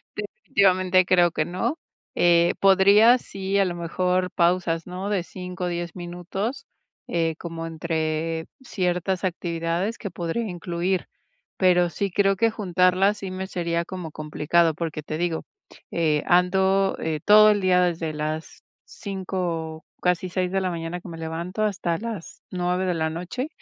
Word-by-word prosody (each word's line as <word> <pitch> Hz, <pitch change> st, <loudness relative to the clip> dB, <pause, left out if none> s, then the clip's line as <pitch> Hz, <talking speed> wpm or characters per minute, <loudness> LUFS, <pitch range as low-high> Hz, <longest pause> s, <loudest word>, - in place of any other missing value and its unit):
Definitivamente, 185 Hz, -, +2 dB
creo 175 Hz, -2 st, +4 dB
que 155 Hz, -, -1 dB
no. 235 Hz, -, -2 dB, 0.4 s
Eh, 170 Hz, 0 st, +4 dB
podría 200 Hz, +5 st, +6 dB
sí, 195 Hz, -3 st, -3 dB
a 195 Hz, -, +4 dB
lo 175 Hz, -, -2 dB
mejor, 180 Hz, +2 st, 0 dB
pausas, 170 Hz, -1 st, +1 dB
¿no?, 185 Hz, +3 st, -4 dB
de 195 Hz, -4 st, 0 dB
5, 180 Hz, 0 st, -6 dB
10 175 Hz, 0 st, -4 dB
minutos, 190 Hz, +9 st, -5 dB, 0.4 s
eh, 165 Hz, -2 st, 0 dB
como 165 Hz, -1 st, -6 dB
entre 160 Hz, 0 st, -2 dB, 0.2 s
ciertas 185 Hz, -4 st, -1 dB
actividades 170 Hz, +3 st, -2 dB
que 200 Hz, -5 st, -6 dB
podría 175 Hz, +6 st, -2 dB
incluir. 175 Hz, 0 st, -2 dB, 0.5 s
Pero 180 Hz, -2 st, +4 dB
sí 200 Hz, +2 st, -2 dB
creo 195 Hz, +1 st, +3 dB
que 230 Hz, +1 st, +3 dB
juntarlas, 190 Hz, 0 st, +2 dB
sí 190 Hz, -2 st, -6 dB
me 190 Hz, +1 st, -4 dB
sería 170 Hz, -2 st, -1 dB
como 180 Hz, -4 st, -6 dB
complicado, 155 Hz, +2 st, +1 dB
porque 160 Hz, -1 st, -4 dB
te 155 Hz, +1 st, -4 dB
digo, 170 Hz, -1 st, -1 dB, 0.5 s
eh, 155 Hz, -3 st, +1 dB
ando, 190 Hz, +2 st, +3 dB
eh, 160 Hz, -1 st, -2 dB
todo 215 Hz, +1 st, +8 dB
el 205 Hz, -, +1 dB
día 180 Hz, -1 st, +4 dB
desde 165 Hz, -3 st, 0 dB
las 155 Hz, +1 st, -5 dB, 0.2 s
5, 180 Hz, -5 st, -4 dB, 0.2 s
casi 180 Hz, 0 st, +1 dB
6 180 Hz, 0 st, -1 dB
de 195 Hz, 0 st, +1 dB
la 185 Hz, -, 0 dB
mañana 170 Hz, +1 st, -4 dB
que 180 Hz, -, -10 dB
me 165 Hz, -, -8 dB
levanto 170 Hz, +5 st, -3 dB
hasta 180 Hz, -5 st, 0 dB
las 220 Hz, -4 st, -7 dB
9 180 Hz, +1 st, 0 dB
de 180 Hz, -, +1 dB
la 160 Hz, -1 st, 0 dB
noche. 180 Hz, -, -4 dB
180 Hz, 150 wpm, -24 LUFS, 165-190 Hz, 0.5 s, todo